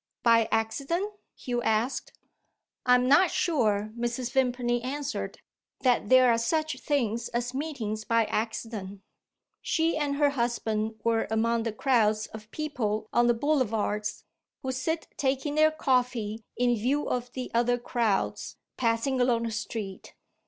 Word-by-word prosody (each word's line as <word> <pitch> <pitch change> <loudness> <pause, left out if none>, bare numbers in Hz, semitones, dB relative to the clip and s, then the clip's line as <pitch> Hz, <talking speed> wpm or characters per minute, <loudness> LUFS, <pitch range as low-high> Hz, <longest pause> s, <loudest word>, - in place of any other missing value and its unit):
"By 230 -2 +5
accident?" 275 - -1 0.2
Hugh 245 -1 -3
asked. 225 +4 0 0.7
"I 250 - +7
am 250 0 +2
not 330 +7 +6
sure," 215 - +1
Mrs. 240 +1 -2
Vimpany 245 -2 +1
answered, 285 +3 -4 0.4
"that 245 -5 +2
there 255 -1 +7
are 230 - +1
such 310 +3 0
things 235 -5 0
as 240 +1 -2
meetings 255 -7 -3
by 230 0 +2
accident. 215 -3 -4 0.6
She 325 0 +1
and 290 -2 0
her 290 0 +3
husband 225 -4 -1
were 230 -1 +1
among 230 +1 +1
the 230 0 -2
crowds 215 -3 +2
of 215 0 -10
people 225 -8 -2
on 240 0 +4
the 240 - +4
Boulevards, 225 -6 0 0.4
who 260 - -1
sit 320 +6 -2
taking 275 +1 0
their 310 +1 +5
coffee 250 -7 0
in 245 0 +3
view 260 +7 0
of 245 0 -2
the 255 -1 -5
other 240 +1 +2
crowds, 235 -4 -1 0.2
passing 240 +2 +1
along 240 -2 +2
the 230 - -2
street. 210 -2 -5
240 Hz, 140 wpm, -28 LUFS, 220-270 Hz, 0.7 s, I